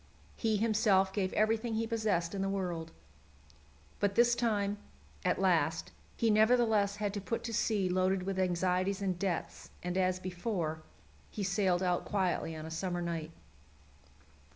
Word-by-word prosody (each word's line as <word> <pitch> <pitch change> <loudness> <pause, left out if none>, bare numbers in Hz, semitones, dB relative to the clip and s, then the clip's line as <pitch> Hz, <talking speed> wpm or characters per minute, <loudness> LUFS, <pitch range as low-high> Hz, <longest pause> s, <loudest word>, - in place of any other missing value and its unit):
He 220 -2 +1
himself 205 -3 +3
gave 190 -2 0
everything 220 +1 +1
he 225 +1 0
possessed 215 -7 0
in 195 - -2
the 195 - 0
world. 175 -4 -3 1.1
But 200 -1 +1
this 240 0 +5
time, 210 -4 0 0.4
as - - +1
last, 165 -4 +1 0.3
he 225 -1 +3
nevertheless 220 -2 +4
had 205 -1 -2
to 205 - -3
put 230 +4 -3
to 230 -1 -4
sea 210 -3 +1
loaded 185 +1 +1
with 190 0 -2
anxieties 185 +2 +1
and 185 -2 -1
debts, 185 -3 -3
and, 180 0 -2
as 185 0 +2
before, 180 -3 -3 0.5
he 210 - -4
sailed 190 -2 +1
out 180 -1 +1
quietly 185 -4 -1
on 155 0 -7
a 160 - -7
summer 175 +1 -2
night. 165 -2 -3
195 Hz, 155 wpm, -32 LUFS, 180-215 Hz, 1.1 s, this